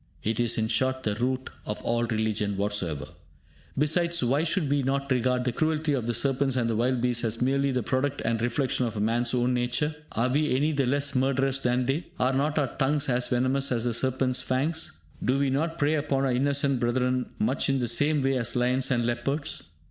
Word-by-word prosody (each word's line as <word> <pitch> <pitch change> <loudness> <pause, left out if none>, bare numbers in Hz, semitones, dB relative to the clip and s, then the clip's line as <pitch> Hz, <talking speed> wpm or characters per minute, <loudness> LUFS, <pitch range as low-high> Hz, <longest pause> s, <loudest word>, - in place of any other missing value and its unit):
It 110 +1 -1
is, 120 0 +1
in 110 -1 +1
short, 130 +4 0
the 105 - 0
root 130 +4 -2
of 105 - -4
all 120 0 0
religion 110 -3 -1
whatsoever. 95 -8 -1 0.7
Besides, 170 +2 +2
why 135 +6 +2
should 170 -1 0
we 145 +1 +1
not 140 +1 -1
regard 125 0 +1
the 125 - 0
cruelty 155 +3 0
of 125 -4 -1
the 120 - 0
serpents 135 0 +1
and 120 -2 +1
the 115 - 0
wild 120 +2 +1
beasts 120 -1 +1
as 115 0 -1
merely 140 +2 +1
the 125 -3 -1
product 135 +5 -1
and 115 -1 0
reflection 125 +1 0
of 110 -2 -4
man's 120 +3 +1
own 125 +1 +1
nature? 125 +5 0 0.2
Are 115 +3 +1
we 145 +1 +1
any 150 +4 +2
the 140 -4 0
less 140 +2 0
murderous 135 +1 +1
than 125 -1 +1
they? 140 +7 -1
Are 130 +1 +2
not 145 +3 0
our 140 -4 0
tongues 145 +1 +1
as 125 0 +1
venomous 130 +2 +1
as 115 -2 0
the 120 -1 0
serpent's 130 +1 0
fangs? 150 +6 -2 0.2
Do 130 +2 +2
we 140 -1 +1
not 160 +5 -1
prey 150 -1 +2
upon 145 -3 0
our 130 - +1
innocent 140 +1 +1
brethren 125 +1 0
much 215 -7 0
in 135 - +2
the 120 - -1
same 145 +5 +2
way 135 0 +2
as 120 0 -2
lions 125 +2 +1
and 120 -3 +1
leopards? 120 - -3
130 Hz, 210 wpm, -27 LUFS, 120-140 Hz, 0.7 s, Besides